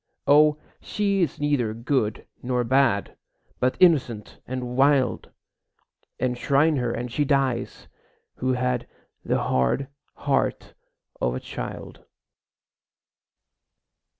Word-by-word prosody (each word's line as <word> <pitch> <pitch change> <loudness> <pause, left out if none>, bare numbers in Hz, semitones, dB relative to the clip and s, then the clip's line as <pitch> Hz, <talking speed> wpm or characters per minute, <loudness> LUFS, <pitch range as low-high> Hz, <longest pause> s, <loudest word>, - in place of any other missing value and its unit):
O, 150 +1 +5 0.2
she 200 -2 -1
is 165 -6 -1
neither 140 -7 0
good 115 -2 -1 0.2
nor 125 0 0
bad, 125 -4 +1 0.4
But 125 0 +1
innocent 135 - +2
and 125 -1 -4
wild! 135 -1 +2 0.9
Enshrine 140 +5 +2
her 120 -2 -1
and 120 +1 -4
she 145 - +1
dies, 135 -4 -1 0.5
who 130 0 0
had 125 -1 -1 0.4
The - - 0
hard 65 - 0 0.3
heart - - -1 0.5
of - - 0
a - - -3
child. - - -8
130 Hz, 100 wpm, -24 LUFS, 120-145 Hz, 0.9 s, O